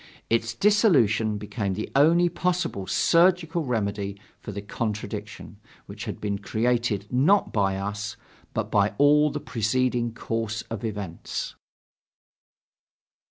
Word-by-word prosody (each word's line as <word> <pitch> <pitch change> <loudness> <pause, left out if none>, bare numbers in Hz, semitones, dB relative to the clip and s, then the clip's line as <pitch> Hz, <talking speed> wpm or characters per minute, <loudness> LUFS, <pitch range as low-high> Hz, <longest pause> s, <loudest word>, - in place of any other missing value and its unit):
Its 115 0 +1
dissolution 120 - +3
became 100 -2 -3
the 110 - -3
only 165 +5 +5
possible 175 - -1
surgical 170 - +3
remedy 100 -5 -2 0.2
for - - -7
the 100 - -5
contradiction, 105 0 -5 0.3
which - - -8
had - - -5
been 100 -1 -2
created, 115 -1 0
not 150 +11 +3
by 95 -3 +1
us, 105 +2 -4 0.4
but - - -2
by 105 0 +2
all 150 +1 +5
the 150 +1 -4
preceding 120 +1 0
course 115 -1 -3
of 115 -2 -4
events. 100 -6 -4
115 Hz, 115 wpm, -25 LUFS, 105-145 Hz, 0.4 s, only